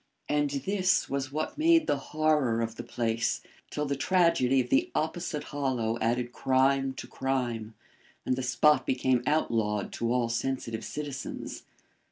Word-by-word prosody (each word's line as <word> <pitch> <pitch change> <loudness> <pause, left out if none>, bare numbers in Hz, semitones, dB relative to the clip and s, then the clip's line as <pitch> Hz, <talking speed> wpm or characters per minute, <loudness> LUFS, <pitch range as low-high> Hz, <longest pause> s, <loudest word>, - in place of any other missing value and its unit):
And 145 -1 +1
this 185 +7 +1
was 135 -1 -2
what 155 - -3
made 330 0 +5
the 145 - +1
horror 150 -7 +2
of 115 0 -3
the 115 - -7
place 115 -1 -1 0.3
till 150 - -2
the 140 0 -1
tragedy 140 -4 +3
of 125 - -1
the 345 +6 +3
opposite 160 -1 -2
hollow 125 -5 -1
added 120 +1 0
crime 135 +1 +2
to - - -7
crime, 120 -5 -2 0.5
and 130 - +1
the 130 - -3
spot 130 +2 +3
became 130 -1 +2
outlawed 110 -9 0
to 115 0 -1
all 125 -1 +2
sensitive 115 -1 -2
citizens. 145 -3 -6
130 Hz, 150 wpm, -29 LUFS, 120-150 Hz, 0.5 s, made